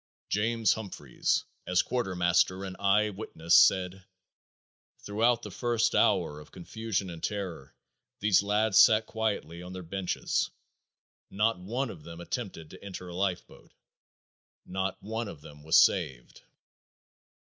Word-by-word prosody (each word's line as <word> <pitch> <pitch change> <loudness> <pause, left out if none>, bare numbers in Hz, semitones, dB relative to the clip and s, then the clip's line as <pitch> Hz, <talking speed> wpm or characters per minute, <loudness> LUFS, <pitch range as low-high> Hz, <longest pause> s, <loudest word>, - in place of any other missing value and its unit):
James 110 +1 +2
Humphries, 95 - -2 0.2
as 90 0 +3
quartermaster 90 -4 +1
and 95 -1 -6
eye 105 +2 +3
witness 85 -5 -3
said, 95 0 +5 0.9
"throughout 115 +3 +1
the - - -7
first 120 -2 0
hour 75 0 +2
of 75 - -14
confusion 100 0 -4
and 85 -1 -9
terror 90 -9 -5 0.4
these 105 -2 +4
lads 105 0 +2
sat 110 0 +6
quietly 100 -7 -3
on 90 +1 -9
their 95 0 -7
benches. 95 +2 -1 0.8
Not 105 0 +1
one 120 +7 -3
of 80 - -11
them 85 +2 -10
attempted 85 -4 -6
to - - -13
enter 90 -2 -8
a 85 - -8
lifeboat. 95 -1 -4 0.9
Not 95 +1 -3
one 110 +2 -3
of 80 -7 -9
them 75 0 -13
was 80 +2 +3
saved." - - +2
95 Hz, 130 wpm, -29 LUFS, 90-110 Hz, 0.9 s, sat